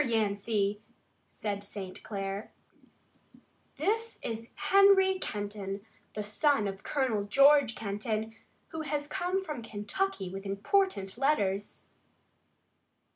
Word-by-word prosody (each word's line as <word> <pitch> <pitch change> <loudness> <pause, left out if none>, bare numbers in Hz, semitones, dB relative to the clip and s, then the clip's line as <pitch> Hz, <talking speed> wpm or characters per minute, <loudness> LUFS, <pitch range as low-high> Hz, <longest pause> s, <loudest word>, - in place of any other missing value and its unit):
Yancey," 210 -3 0 0.5
said 205 -1 -4
St. 200 -2 -7
Clair, 195 0 -4 1.3
"this 450 +2 0
is 230 0 -4
Henry 385 -1 +5
Kenton, 205 - -4 0.3
the 210 - -2
son 215 +2 +2
of 195 0 -5
Colonel 245 -8 0
George 275 +2 +6
Kenton, 215 +1 -3 0.3
who 320 -1 -4
has 295 -1 -2
come 370 +4 -1
from 300 -7 -4
Kentucky 220 - -2
with 195 +2 -6
important 200 - 0
letters." 205 -8 0
220 Hz, 100 wpm, -30 LUFS, 200-300 Hz, 1.3 s, George